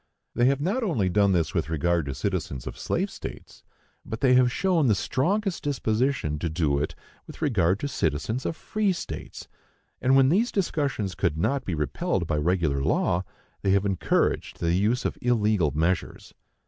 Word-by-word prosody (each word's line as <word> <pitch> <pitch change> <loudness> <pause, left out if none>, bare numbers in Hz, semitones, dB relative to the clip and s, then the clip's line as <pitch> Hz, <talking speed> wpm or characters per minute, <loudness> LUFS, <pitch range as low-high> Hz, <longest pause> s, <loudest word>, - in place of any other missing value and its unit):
They 120 - +2
have 135 +1 +3
not 200 - 0
only 145 - 0
done 100 +1 +3
this 85 -4 +1
with 75 - -1
regard 80 0 0
to 70 - -3
citizens 65 -1 -3
of - - -6
slave - - -2
states, - - -9 0.4
but 110 - -6
they 130 -2 +5
have 125 -1 +5
shown 175 -2 +2
the 110 - +4
strongest 195 - 0
disposition 125 - 0
to 85 - -2
do 75 -3 +1
it 75 - -3 0.3
with - - -11
regard 100 - +2
to 145 - -1
citizens 110 - -1
of - - -2
free 210 +1 0
states; 175 - -7 0.5
and 130 +1 +4
when 135 -1 +5
these 215 - +2
discussions 140 - -1
could 85 -4 -1
not 135 +11 0
be 90 - -2
repelled 75 -1 -1
by 75 - -1
regular 80 -3 +1
law, 85 +5 +1 0.4
they 95 - 0
have 100 0 +2
encouraged 95 -3 0
the 85 0 +1
use 105 +7 +1
of - - -2
illegal 105 -8 +2
measures. 80 +6 -2
105 Hz, 175 wpm, -26 LUFS, 85-140 Hz, 0.5 s, they